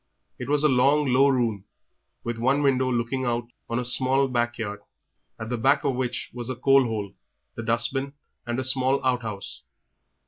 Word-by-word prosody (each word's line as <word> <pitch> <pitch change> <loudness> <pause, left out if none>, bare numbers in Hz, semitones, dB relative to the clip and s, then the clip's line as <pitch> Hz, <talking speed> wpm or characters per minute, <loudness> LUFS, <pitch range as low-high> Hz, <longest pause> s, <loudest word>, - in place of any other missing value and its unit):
It 125 +1 -6
was 145 0 +3
a - - +6
long, 135 +1 +3
low 135 +2 +5
room, 115 -7 0 0.6
with 120 -1 -4
one 135 +5 +1
window 130 -2 +2
looking 120 +2 -1
on 120 0 -2 0.2
a 120 +1 -2
small 130 +2 +3
back 120 -2 -1
yard, 105 -2 -5 0.6
at 110 0 -6
the 120 -1 -3
back 135 +5 +2
of 135 - 0
which 125 -1 -3
was 120 -1 -5
the 130 - -3
coal 135 +2 +4
hole, 105 -4 -4 0.4
the - - -6
dust 115 +2 +1
bin, 140 +1 -3 0.3
and 120 +1 -2
a - - -1
small 130 +1 +2
outhouse. 115 -6 -2
125 Hz, 180 wpm, -25 LUFS, 120-135 Hz, 0.6 s, a